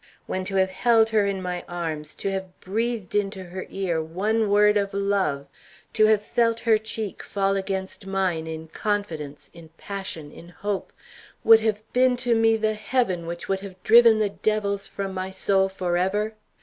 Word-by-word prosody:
When 185 Hz, -, -3 dB
to 195 Hz, -, -3 dB
have 190 Hz, 0 st, +2 dB
held 225 Hz, +2 st, +3 dB
her 215 Hz, -2 st, +2 dB
in 195 Hz, -1 st, -2 dB
my 180 Hz, -1 st, -3 dB
arms, 160 Hz, -3 st, -4 dB
to 195 Hz, -, -3 dB
have 190 Hz, -1 st, -5 dB
breathed 220 Hz, 0 st, -2 dB
into 195 Hz, -2 st, -1 dB
her 185 Hz, +1 st, -7 dB
ear 180 Hz, -4 st, -1 dB
one 205 Hz, +7 st, 0 dB
word 210 Hz, +1 st, +5 dB
of 200 Hz, -1 st, 0 dB
love, 195 Hz, -9 st, 0 dB, 0.5 s
to 215 Hz, -1 st, +5 dB
have 215 Hz, -1 st, +3 dB
felt 230 Hz, 0 st, +1 dB
her 225 Hz, -2 st, +3 dB
cheek 220 Hz, -2 st, -4 dB
fall 195 Hz, -1 st, 0 dB
against 190 Hz, 0 st, -4 dB
mine 185 Hz, -4 st, -1 dB
in 160 Hz, 0 st, -6 dB
confidence, 165 Hz, -8 st, -3 dB
in 170 Hz, -1 st, -13 dB
passion, 190 Hz, -7 st, -6 dB
in 170 Hz, -, -13 dB
hope, 200 Hz, +2 st, -4 dB, 0.5 s
would 225 Hz, 0 st, +8 dB
have 215 Hz, -1 st, -1 dB
been 250 Hz, 0 st, +4 dB
to 245 Hz, -1 st, +1 dB
me 225 Hz, 0 st, +4 dB
the 215 Hz, 0 st, 0 dB
heaven 210 Hz, -6 st, -1 dB
which 170 Hz, 0 st, -6 dB
would 195 Hz, 0 st, 0 dB
have 195 Hz, -1 st, -9 dB
driven 230 Hz, 0 st, +7 dB
the 215 Hz, -1 st, +1 dB
devils 200 Hz, -1 st, -1 dB
from 195 Hz, -1 st, -5 dB
my 185 Hz, 0 st, -3 dB
soul 190 Hz, 0 st, +2 dB
forever? 190 Hz, +3 st, -1 dB
195 Hz, 175 wpm, -24 LUFS, 185-215 Hz, 0.5 s, would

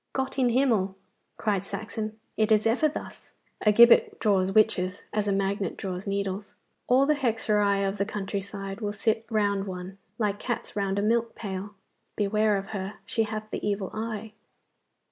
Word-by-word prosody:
'Gott 265 Hz, +1 st, -2 dB
in 250 Hz, -2 st, +4 dB
Himmel!' 230 Hz, -7 st, +2 dB, 0.4 s
cried 200 Hz, -4 st, 0 dB
Saxon, 215 Hz, +2 st, -5 dB, 0.2 s
'it 220 Hz, 0 st, +1 dB
is 215 Hz, 0 st, +4 dB
ever 250 Hz, +7 st, +3 dB
thus! 295 Hz, -, -9 dB, 0.3 s
A 210 Hz, -, +6 dB
gibbet 235 Hz, +3 st, +6 dB
draws 195 Hz, -3 st, +2 dB
witches 195 Hz, -3 st, +2 dB
as 210 Hz, -1 st, 0 dB
a -, -, +2 dB
magnet 195 Hz, -1 st, -1 dB
draws 185 Hz, 0 st, -5 dB
needles. 200 Hz, 0 st, -3 dB, 0.3 s
All 260 Hz, +2 st, +5 dB
the 300 Hz, -, +4 dB
hexerei 210 Hz, -7 st, +1 dB
of 195 Hz, +1 st, -3 dB
the 200 Hz, -, +2 dB
country 200 Hz, -1 st, -3 dB
side 195 Hz, +1 st, -7 dB
will 205 Hz, -1 st, -2 dB
sit 220 Hz, +2 st, 0 dB
round 205 Hz, -3 st, +1 dB
one, 185 Hz, +1 st, -7 dB, 0.2 s
like 210 Hz, -2 st, 0 dB
cats 240 Hz, -2 st, -4 dB
round 195 Hz, -1 st, 0 dB
a 200 Hz, -, +1 dB
milk 230 Hz, +1 st, +1 dB
pail. 200 Hz, 0 st, -5 dB, 0.4 s
Beware 210 Hz, 0 st, +2 dB
of 195 Hz, +1 st, -6 dB
her! 200 Hz, -1 st, -4 dB
she 225 Hz, -, 0 dB
hath 215 Hz, 0 st, -5 dB
the -, -, -4 dB
evil 200 Hz, -2 st, -1 dB
eye! 220 Hz, -1 st, -4 dB
210 Hz, 170 wpm, -27 LUFS, 195-220 Hz, 0.4 s, A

